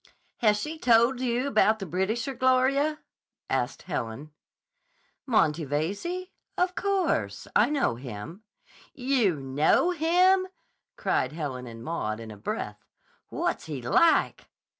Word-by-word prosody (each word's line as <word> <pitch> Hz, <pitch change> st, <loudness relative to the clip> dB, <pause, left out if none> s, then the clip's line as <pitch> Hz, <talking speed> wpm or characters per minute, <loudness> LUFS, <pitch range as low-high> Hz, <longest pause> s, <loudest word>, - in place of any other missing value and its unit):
"Has 210 Hz, -3 st, +3 dB
she 315 Hz, +8 st, -5 dB
told 235 Hz, +1 st, +4 dB
you 250 Hz, +1 st, 0 dB
about 220 Hz, -4 st, +3 dB
the 195 Hz, -, -6 dB
Britisher, 210 Hz, -, -1 dB
Gloria?" 265 Hz, +4 st, +2 dB, 0.5 s
asked -, -, -1 dB
Helen. 145 Hz, -3 st, -5 dB, 1.0 s
"Monty 165 Hz, -, +2 dB
Veyze? 200 Hz, -, -3 dB, 0.3 s
Of 360 Hz, 0 st, +1 dB
course. 350 Hz, -, -1 dB
I 220 Hz, +5 st, +5 dB
know 280 Hz, -, 0 dB
him." 125 Hz, -, -8 dB, 0.5 s
"You 250 Hz, -, +1 dB
know 145 Hz, -, +2 dB
him!" 360 Hz, +3 st, +3 dB, 0.5 s
cried 130 Hz, +3 st, 0 dB
Helen 135 Hz, -6 st, -5 dB
and 115 Hz, -1 st, -9 dB
Maud 115 Hz, -9 st, -3 dB
in 115 Hz, -1 st, -8 dB
a -, -, -9 dB
breath. 100 Hz, -, -5 dB, 0.5 s
"What's -, -, -2 dB
he 150 Hz, -4 st, -4 dB
like?" 320 Hz, -, +3 dB
215 Hz, 120 wpm, -27 LUFS, -, 1.0 s, I